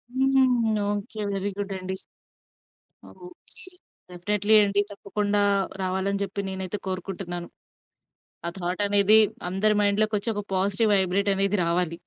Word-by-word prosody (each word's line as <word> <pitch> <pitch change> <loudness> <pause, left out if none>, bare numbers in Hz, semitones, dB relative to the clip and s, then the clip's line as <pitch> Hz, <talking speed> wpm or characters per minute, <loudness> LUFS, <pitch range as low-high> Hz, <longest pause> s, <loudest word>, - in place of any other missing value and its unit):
హ్మ్. 260 -4 +2
Okay. 205 +1 -4
Very 195 +1 -2
good 200 -1 -4
అండి. 185 0 -5 1.1
Okay. 360 +1 -14 0.5
Definitely 205 +4 +1
అండి. 200 0 +2
తప్పకుండా 205 +1 -2 0.4
రావాలని 190 +2 -1
చెప్పి 200 +1 -4
నేనైతే 190 +1 -4
కోరుకుంటున్నాను. 180 -2 -5 1.0
ఆ - - -1
థాట్ 180 +2 -3
అనేది 200 +1 +5 0.3
అందరి 200 +4 +2
మైండ్‌లో 205 +1 +2
కోచ్చి, 210 +2 -1
ఒక 205 - -3
పాజిటివ్ 200 +3 +2
వైబ్రేట్ 195 +1 +1
అనేది 195 +1 +1
రావాలి. 170 0 -1
200 Hz, 120 wpm, -25 LUFS, 190-210 Hz, 1.1 s, అనేది